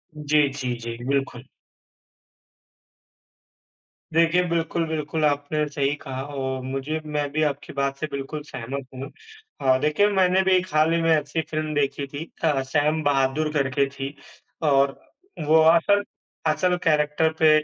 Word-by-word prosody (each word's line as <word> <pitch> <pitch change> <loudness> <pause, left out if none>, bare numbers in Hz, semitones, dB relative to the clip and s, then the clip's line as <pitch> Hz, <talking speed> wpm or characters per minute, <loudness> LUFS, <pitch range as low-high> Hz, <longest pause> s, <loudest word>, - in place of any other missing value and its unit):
जी, 150 -1 +2
जी, 130 -3 -3
जी, 115 0 -6
बिल्कुल। 135 -2 -2 2.7
देखिए, 165 +2 +4
बिल्कुल, 165 0 0
बिल्कुल, 155 0 -2
आपने 145 +1 0
सही 140 0 0
कहा 130 -1 -5
और 135 -2 -4
मुझे 135 +4 -3
मैं 150 -1 -2
भी 155 +2 0
आपकी 145 -1 -2
बात 140 0 -1
से 155 - -2
बिल्कुल 140 +2 -5
सहमत 135 0 -6
हूँ। 130 +2 -7 0.5
अ, 130 -1 +4
देखिए, 150 +8 +3
मैंने 190 -2 +3
भी 190 - +2
एक 185 0 -2
हाल 155 +2 +3
ही 170 - +1
में 165 - +1
ऐसी 155 +1 +1
फ़िल्म 155 0 -2
देखी 140 0 0
थी 145 +3 -6 0.2
अ, 150 -4 +2
सैम 150 +3 +1
बहादुर 145 +1 +1
करके 140 -1 +1
थी 135 0 -6 0.5
और 140 -2 +3 0.5
वो 160 +1 +6
असल 170 +5 +4 0.4
असल 180 +4 +2
कैरेक्टर 150 -1 +2
पे 160 - +6
150 Hz, 145 wpm, -24 LUFS, 135-160 Hz, 2.7 s, वो